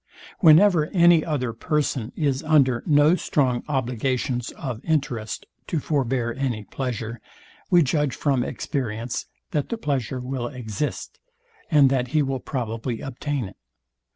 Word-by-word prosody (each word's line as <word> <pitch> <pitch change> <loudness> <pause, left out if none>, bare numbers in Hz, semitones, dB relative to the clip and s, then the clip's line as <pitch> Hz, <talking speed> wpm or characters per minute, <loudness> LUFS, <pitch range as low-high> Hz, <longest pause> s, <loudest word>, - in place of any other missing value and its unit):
Whenever 165 -2 +6
any 170 -2 +6
other 130 -7 -2
person 130 -2 -1
is 140 -3 0
under 140 -6 +3
no 150 +2 +5
strong 130 -8 0
obligations 125 -2 -1
of 125 -5 -6
interest 135 -9 -2 0.2
to 165 - -1
forbear 130 -5 0
any 125 -5 -2
pleasure, 120 -1 -4 0.5
we 175 -2 +6
judge 145 -1 0
from 135 -4 +1
experience, 120 -3 -3 0.2
that 145 -2 -1
the 230 - -2
pleasure 135 - -2
will 125 -1 -3
exist, 125 +1 -5 0.5
and 145 -4 +5
that 125 -2 +1
he 150 +3 +2
will 135 -1 -2
probably 115 -3 -3
obtain 135 0 -3
it. 95 - -11
135 Hz, 130 wpm, -24 LUFS, 120-150 Hz, 0.5 s, Whenever